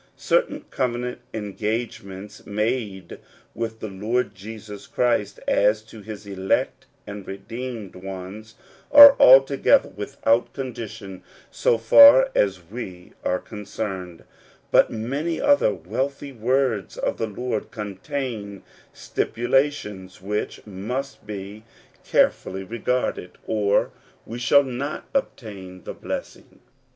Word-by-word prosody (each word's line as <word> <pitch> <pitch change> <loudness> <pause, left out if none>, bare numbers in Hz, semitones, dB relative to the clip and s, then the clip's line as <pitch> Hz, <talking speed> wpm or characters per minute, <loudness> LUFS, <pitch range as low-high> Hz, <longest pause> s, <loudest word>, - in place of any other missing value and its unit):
Certain - - +1
covenant 125 -1 -2
engagements, 105 -1 -5
made 105 -3 -3 0.3
with 115 -1 -5
the - - -4
Lord 110 +6 -1
Jesus 105 +1 -10
Christ, 120 -5 0
as 105 +1 +3
to 110 0 -13
his 105 0 -9
elect 95 -1 -1 0.2
and 100 -1 -8
redeemed 115 +2 -7
ones, 95 +3 -8 0.4
are 285 -1 +11
altogether 135 - +6
without 115 +3 0
condition 110 -7 -7 0.3
so 115 - +2
far 270 - +8
as 95 -3 +1
we 90 -3 -8
are 90 - +1
concerned; 95 -4 -6 0.5
but - - +5
many 140 +9 -3
other 285 - +4
wealthy 130 - -4
words 125 -3 0
of - - -2
the 115 - -1
Lord 110 +1 -4
contain 105 0 -5 0.3
stipulations 115 -7 -1
which 105 +3 -4
must 110 +6 -5
be 105 +1 -7 0.4
care - - +4
fully 95 +1 -8
regarded, 115 -3 -2
or 105 -2 +1 0.3
we 115 +2 -7
shall 140 +3 +5
not 135 +3 -4
obtain 100 - -4
the - - -6
blessing. - - -7
110 Hz, 110 wpm, -23 LUFS, 100-125 Hz, 0.5 s, are